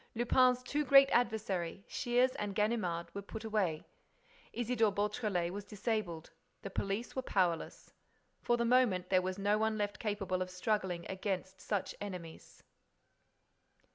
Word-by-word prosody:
Lupin's 250 Hz, +1 st, +3 dB
two 290 Hz, +4 st, -1 dB
great 275 Hz, 0 st, +7 dB
adversaries, 200 Hz, -7 st, 0 dB
Shears 245 Hz, 0 st, +2 dB
and 205 Hz, -2 st, -3 dB
Ganimard, 210 Hz, -6 st, -1 dB
were 200 Hz, -, -4 dB
put 220 Hz, +3 st, -8 dB
away. 200 Hz, -8 st, -1 dB, 0.7 s
Isidore 235 Hz, -2 st, +1 dB
Beautrelet 205 Hz, -4 st, -1 dB
was 205 Hz, +1 st, -5 dB
disabled. 205 Hz, -5 st, -3 dB, 0.3 s
The 195 Hz, -, -6 dB
police 200 Hz, +5 st, -3 dB
were 260 Hz, -, 0 dB
powerless. 180 Hz, -9 st, -1 dB, 0.5 s
For 240 Hz, -, +2 dB
the 235 Hz, -, +1 dB
moment 230 Hz, -7 st, +3 dB
there 185 Hz, -1 st, +5 dB
was 185 Hz, +1 st, -3 dB
no 205 Hz, +1 st, +2 dB
one 220 Hz, 0 st, +1 dB
left 205 Hz, -1 st, -2 dB
capable 195 Hz, -4 st, -2 dB
of 185 Hz, -, -2 dB
struggling 185 Hz, -2 st, -1 dB
against 190 Hz, -1 st, -4 dB
such 205 Hz, -3 st, -2 dB
enemies. 180 Hz, -5 st, -8 dB
205 Hz, 140 wpm, -34 LUFS, 185-230 Hz, 0.7 s, great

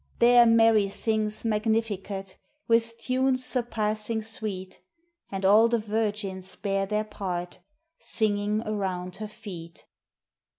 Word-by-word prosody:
There 240 Hz, 0 st, +6 dB
Mary 225 Hz, -3 st, +5 dB
sings 215 Hz, +1 st, -1 dB
"Magnificat," 210 Hz, -3 st, -1 dB, 0.3 s
With 230 Hz, 0 st, +2 dB
tunes 255 Hz, +1 st, +1 dB
surpassing 220 Hz, -3 st, -1 dB
sweet; 215 Hz, -5 st, -5 dB, 0.5 s
And 195 Hz, -1 st, -3 dB
all 215 Hz, +4 st, +6 dB
the 235 Hz, 0 st, +2 dB
virgins 210 Hz, -3 st, -3 dB
bear 195 Hz, -1 st, -1 dB
their 210 Hz, +1 st, 0 dB
part, 180 Hz, -4 st, -5 dB, 0.4 s
Singing 210 Hz, 0 st, 0 dB
around 185 Hz, -4 st, -3 dB
her 215 Hz, +1 st, -5 dB
feet. 170 Hz, -6 st, -10 dB
215 Hz, 110 wpm, -27 LUFS, 195-225 Hz, 0.5 s, There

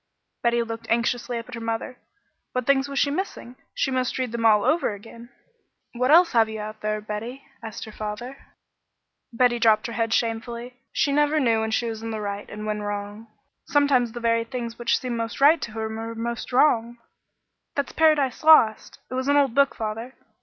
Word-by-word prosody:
Betty 235 Hz, 0 st, +2 dB
looked 230 Hz, 0 st, -7 dB
anxiously 235 Hz, +1 st, 0 dB
up 230 Hz, -, -7 dB
at 250 Hz, -, -12 dB
her 230 Hz, -, -6 dB
mother. 230 Hz, +2 st, -4 dB, 0.5 s
What 255 Hz, -1 st, -1 dB
things 275 Hz, 0 st, +2 dB
was 275 Hz, -, -5 dB
she 285 Hz, -, +2 dB
missing? 290 Hz, -7 st, -5 dB, 0.2 s
She 270 Hz, -, 0 dB
must 255 Hz, -1 st, -1 dB
read 255 Hz, -3 st, -2 dB
them 230 Hz, -1 st, +1 dB
all 210 Hz, -2 st, +4 dB
over 305 Hz, -9 st, +1 dB
again. 230 Hz, +3 st, -13 dB, 0.6 s
"What 250 Hz, +1 st, 0 dB
else 335 Hz, +3 st, +6 dB
have 225 Hz, -2 st, +3 dB
you 220 Hz, 0 st, -6 dB
out 215 Hz, +1 st, -7 dB
there, 215 Hz, 0 st, -1 dB
Betty?" 220 Hz, +6 st, -6 dB, 0.2 s
asked 225 Hz, -2 st, -7 dB
her 220 Hz, -, -10 dB
father. 215 Hz, +5 st, -6 dB, 1.0 s
Betty 240 Hz, 0 st, +2 dB
dropped 220 Hz, -2 st, +4 dB
her 235 Hz, -, -4 dB
head 230 Hz, -1 st, -1 dB
shamefacedly. 235 Hz, +2 st, -2 dB, 0.2 s
She 285 Hz, -, +1 dB
never 295 Hz, +2 st, +2 dB
knew 230 Hz, -5 st, +2 dB
when 220 Hz, 0 st, -1 dB
she 220 Hz, +2 st, 0 dB
was 220 Hz, -1 st, -5 dB
in 225 Hz, -, -5 dB
the 220 Hz, -1 st, -4 dB
right 205 Hz, -1 st, -5 dB
and 210 Hz, +1 st, -7 dB
when 210 Hz, 0 st, -2 dB
wrong. 205 Hz, +1 st, -5 dB, 0.4 s
Sometimes 270 Hz, -5 st, +2 dB
the 240 Hz, -, -5 dB
very 230 Hz, 0 st, +1 dB
things 235 Hz, -1 st, -6 dB
which 240 Hz, -, +2 dB
seemed 245 Hz, -2 st, -4 dB
most 230 Hz, 0 st, -4 dB
right 300 Hz, +4 st, +5 dB
to 215 Hz, -, -5 dB
her 220 Hz, 0 st, -3 dB
were 225 Hz, +1 st, -6 dB
most 235 Hz, +1 st, -4 dB
wrong. 240 Hz, -3 st, +3 dB, 0.8 s
"That's 280 Hz, -, -2 dB
'Paradise 305 Hz, -5 st, +2 dB
Lost.' 310 Hz, -9 st, +5 dB
It -, -, -5 dB
was 260 Hz, +1 st, -2 dB
an 285 Hz, 0 st, +4 dB
old 275 Hz, -4 st, +3 dB
book, 280 Hz, +1 st, +3 dB
father. 225 Hz, +4 st, -5 dB
235 Hz, 200 wpm, -24 LUFS, 220-255 Hz, 1.0 s, else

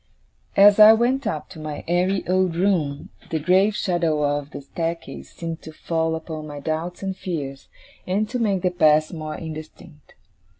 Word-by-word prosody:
As 205 Hz, +1 st, +7 dB
I 215 Hz, +1 st, +10 dB
went 245 Hz, +3 st, +1 dB
up 155 Hz, -8 st, -3 dB
to 170 Hz, -, -11 dB
my 155 Hz, -1 st, -6 dB
airy 180 Hz, +3 st, +1 dB
old 185 Hz, -1 st, +1 dB
room, 165 Hz, -6 st, 0 dB, 0.2 s
the 160 Hz, -, -1 dB
grave 185 Hz, +6 st, +3 dB
shadow 170 Hz, -6 st, 0 dB
of 145 Hz, 0 st, -1 dB
the 145 Hz, -, -8 dB
staircase 165 Hz, +4 st, -5 dB
seemed 165 Hz, -1 st, -6 dB
to 160 Hz, -, -10 dB
fall 160 Hz, +1 st, -1 dB
upon 160 Hz, -1 st, -6 dB
my 145 Hz, -1 st, -7 dB
doubts 160 Hz, +5 st, -4 dB
and 190 Hz, -1 st, -2 dB
fears, 145 Hz, -8 st, -5 dB, 0.4 s
and 200 Hz, +4 st, 0 dB
to 250 Hz, -, -2 dB
make 200 Hz, -5 st, 0 dB
the 180 Hz, -, +2 dB
past 155 Hz, -2 st, +3 dB
more 155 Hz, -2 st, -5 dB
indistinct. 155 Hz, -1 st, -10 dB
165 Hz, 170 wpm, -23 LUFS, 155-190 Hz, 0.4 s, I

